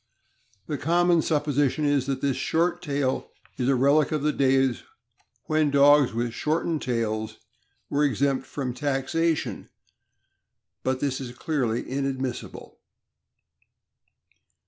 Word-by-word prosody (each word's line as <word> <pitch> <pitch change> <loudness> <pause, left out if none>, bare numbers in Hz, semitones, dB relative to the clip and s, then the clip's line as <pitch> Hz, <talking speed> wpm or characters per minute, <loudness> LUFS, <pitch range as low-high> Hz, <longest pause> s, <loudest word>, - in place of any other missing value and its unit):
..The 145 -3 -4
common 170 +1 +3
supposition 150 -1 0
is 145 -2 +1
that 135 -1 -2
this 140 -2 +1
short 170 +2 0
tail 140 -5 -2 0.3
is 125 +1 +1
a 135 - +4
relic 140 +4 +3
of 155 -2 -1
the 150 0 +1
days 135 -2 +2 0.6
when 155 -1 +2
dogs 140 -1 +5
with 115 0 -2
shortened 155 +4 -1
tails 110 -2 -2 0.5
were 145 +1 0
exempt 140 0 0
from 130 -4 -4
taxation, 145 +4 -1 1.1
but 130 0 -1
this 140 -2 -1
is 125 -1 -8
clearly 125 -7 -1
inadmissible. 135 -2 -4
140 Hz, 115 wpm, -25 LUFS, 130-150 Hz, 1.1 s, dogs